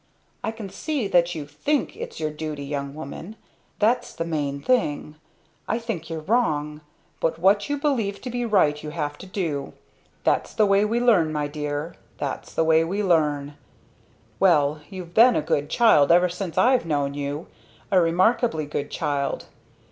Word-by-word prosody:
"I - - -1
can 220 -2 -6
see 245 - -3
that 175 -1 +2
you 150 -2 -5
think 285 - -1
its - - -7
your 155 -1 -1
duty, 150 -1 -5
young, 140 0 -4
woman 160 +7 -8 0.4
that's 240 +3 +1
the 165 - -3
main 145 -4 -2
thing. 150 - 0 0.5
I 225 - 0
think 225 -9 -5
you're 160 -1 -4
wrong. 155 -7 0 0.4
But 160 0 0
what 200 +5 +3
you 290 - 0
believe 245 -9 -1
to 250 - -5
be 245 0 -2
right 185 -10 +2
you 155 - -6
have 145 -1 -3
to 190 - -10
do. 160 -8 -3 0.5
That's - - 0
the 215 - +4
way 200 +1 +4
we 230 +3 0
learn 205 -10 +4
my 150 -1 -1
dear, 150 +2 -4 0.2
that's - - -4
the - - +3
way 160 0 +4
we 195 +5 -2
learn! 150 -5 +1 0.8
Well 150 -5 +3
you've 180 -3 -8
been 240 +4 +6
a - - +2
good 145 +1 0
child 195 - +5
ever 180 +1 +5
since 180 -1 -5
I've 250 -7 +4
known 145 -3 0
you. 145 +2 -4 0.5
A 185 -2 +5
remarkably 175 0 +2
good 145 0 -4
child. 140 -1 -2
165 Hz, 170 wpm, -24 LUFS, 150-210 Hz, 0.8 s, been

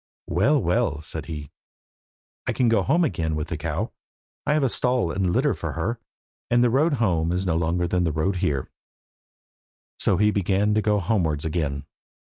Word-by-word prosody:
"Well, 135 - +2
well," 110 - +1
said 80 0 -6
he, 75 -4 -6 1.0
"I - - +1
can 125 -2 +2
go 115 -3 +3
home 165 - +2
again 80 - -1
with 75 -1 -3
the - - -2
cow. - - -2 0.6
I - - +3
have 140 -5 +2
stall 125 -9 +1
and 95 -1 0
litter - - +2
for - - -5
her, 115 +3 -2 0.5
and 120 0 +4
the 120 - +3
road 150 +6 +3
home 90 - +1
is 90 +2 -1
no 85 -3 +1
longer 85 +2 0
than 90 0 +1
the 80 - +1
road 80 +6 0
here." 75 -8 -1 1.3
So - - +2
he 105 +1 +4
began 100 +1 +1
to 110 - +2
go 105 -1 +2
homewards 85 -8 0
again. 75 -4 -2
95 Hz, 180 wpm, -24 LUFS, 80-115 Hz, 1.3 s, and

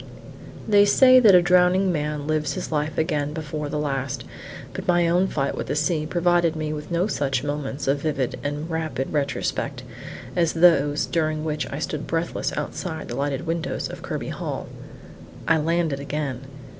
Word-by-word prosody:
They 205 -2 +6
say 255 +5 +7
that 215 -6 +7
a 175 - +6
drowning 180 +2 +4
man 150 -2 -2
lives 155 -2 0
his - - -5
life 150 0 -1
again 150 -3 0
before 150 -1 -4
the 150 - -2
last; 135 -4 -2 0.5
but - - -6
my 175 -1 +3
own 180 +3 +3
fight 140 -6 -1
with - - -4
the - - -1
sea 155 0 0
provided 175 -1 +2
me 155 -1 -3
with 150 0 -7
no 170 +1 +1
such 135 - -1
moments 145 -2 -3
of 140 +1 +1
vivid 140 -5 -2
and 145 +2 -3
rapid 160 -6 -3
retrospect 140 -2 -2 0.5
as 170 -2 +2
those 150 -4 +4
during 155 -2 -1
which 150 -1 -3
I 140 - -4
stood 155 -1 -4
breathless 165 +1 -1
outside 160 -3 -4
the 120 - -4
lighted 140 +3 -2
windows 165 0 -2
of - - -8
Kirby - - -4
Hall. - - -4 0.8
I 165 0 +4
landed 165 -2 0
again. 140 -2 -4
155 Hz, 170 wpm, -24 LUFS, 145-170 Hz, 0.8 s, say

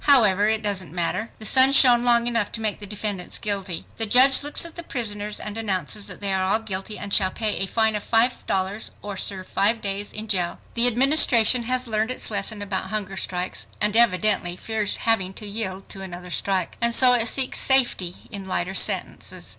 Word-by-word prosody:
However, 215 -7 +4
it 220 0 -2
doesn't 190 -6 -4
matter. 180 +6 -2
The 220 - -10
sun 260 +4 +4
shone 245 -3 +5
long 235 -1 +3
enough 230 -3 -1
to - - -4
make 215 -2 -3
the 205 - -9
defendants 205 -2 -4
guilty. 195 -5 -5
The 225 - 0
judge 260 +5 +6
looks 290 +3 +2
at 335 - -10
the 340 - -7
prisoners 210 -8 -5
and 210 +1 -7
announces 200 -1 -3
that - - -11
they 200 -1 -2
are 190 +2 +1
"guilty" 210 -1 -6
and 200 -1 -6
"shall 190 -2 +4
pay 215 +1 -3
a 195 - -1
fine 220 +1 0
of 210 - -4
$5.00 220 -4 0
or 205 -1 -6
serve 190 -1 -2
five 210 +5 0
days 200 0 -4
in 215 +1 -7
jail." 180 -4 -1
The 235 +1 +4
Administration 245 -2 +4
has 255 0 -1
learned 220 0 -2
its 255 - +1
lesson 205 +1 -3
about 195 -2 -3
hunger 205 -3 -3
strikes 180 -1 -2
and 210 +1 -1
evidently 210 -5 +2
fears 215 +1 -1
having 195 -5 0
to 215 - -8
yield 200 -2 -4
to 195 - -3
another 180 -1 -8
strike. 190 +1 -2
And 235 0 +3
so 255 -1 +7
it 235 -1 +2
seeks 265 0 +2
safety 240 -10 +2 0.2
in 195 -1 -6
lighter 185 0 -2
sentences. - - 0
210 Hz, 200 wpm, -22 LUFS, 195-235 Hz, 0.2 s, so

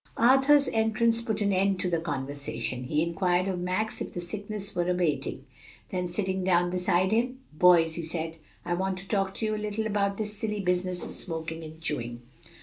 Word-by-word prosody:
Arthur's 270 +4 +5
entrance 225 +1 +2
put 220 -2 -2
an 200 -1 +2
end 190 0 +2
to 185 - +1
the 170 -2 +1
conversation. 140 -4 -3
He 150 +4 +1
inquired 175 +2 +1
of 185 -2 -1
Max 185 +5 -1
if - - -5
the - - -2
sickness 205 +3 -5
were 175 0 +1
abating; 170 -6 0 0.5
then 180 -1 -1
sitting 190 +1 -1
down 175 -1 +3
beside 180 +1 +2
him, 245 +3 +1 0.2
"Boys," 165 0 +5
he 170 - -3
said, 165 0 -4 0.3
"I 175 - 0
want 190 +1 -1
to 190 +1 -9
talk 195 -2 0
to 220 - -2
you 215 - 0
a 210 - -4
little 210 +1 -2
about 200 -2 0
this 210 -1 -2
silly 210 0 -2
business 180 -1 0
of - - -7
smoking 160 -1 -5
and 160 0 -10
chewing." 120 -6 -4
185 Hz, 195 wpm, -28 LUFS, 170-210 Hz, 0.5 s, Arthur's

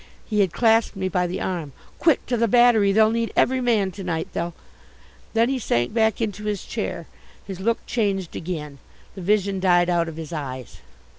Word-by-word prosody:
He 210 -2 -1
had 190 -4 +3
clasped 225 0 +2
me 190 -1 -2
by 180 0 0
the 175 - -4
arm. 165 -7 -3 0.3
"Quick, 320 -4 +3
to 250 - -1
the 230 0 +2
Battery, 230 -3 +5
they'll 215 +2 +4
need 230 0 -1
every 260 +1 +2
man 220 -6 +1
to 195 +1 -8
night, 165 -3 -2
they'll 170 0 -3 0.4
" - - -28
Then 230 +1 +4
he 265 0 -1
sank 120 - 0
back 220 -2 +2
into 210 -2 -3
his 210 -3 -3
chair. - - -4 0.4
His 190 -2 -7
look 225 +4 -1
changed 195 -6 -1
again. 150 -5 -5 0.3
The 190 - -9
vision 200 0 +1
died 175 -1 +3
out 170 -1 +1
of 160 - -9
his 160 0 -7
eyes. 130 -5 -6
195 Hz, 200 wpm, -23 LUFS, 175-225 Hz, 0.4 s, Battery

